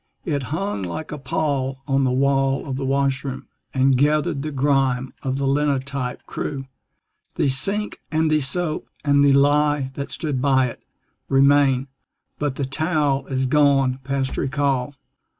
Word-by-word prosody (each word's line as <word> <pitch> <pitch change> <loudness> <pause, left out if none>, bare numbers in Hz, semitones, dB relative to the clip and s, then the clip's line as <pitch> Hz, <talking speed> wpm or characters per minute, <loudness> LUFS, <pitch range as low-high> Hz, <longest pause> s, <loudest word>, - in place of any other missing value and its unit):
It 145 -5 -1
hung 175 - -2
like 95 - -5
a 150 - -5
pall 135 -2 -2
on 135 -1 +2
the 130 - +1
wall 135 +1 +1
of 135 - -3
the 135 0 -3
washroom, 135 0 -1 0.3
And 130 0 +3
gathered 145 -1 +1
the 155 - -3
grime 135 -2 +1
of 130 0 -2
the 140 - -1
linotype 140 -2 -1
crew. 135 -2 -4 0.7
The 140 - +1
sink 200 +11 +1
and 160 0 +1
the 155 - +4
soap 155 +4 -1 0.2
and 140 -1 +4
the 140 -1 +5
lye 145 0 +3
that 140 +1 -5
stood 150 -6 -2
by 130 -2 +3
it - - -11 0.5
Remain; 135 -1 +4 0.5
but 145 -3 -1
the 140 - -2
towel 145 -1 0
is 130 -1 -1
gone 135 -2 +3
past 135 0 -2
recall. 140 -1 -1
140 Hz, 150 wpm, -22 LUFS, 135-145 Hz, 0.7 s, the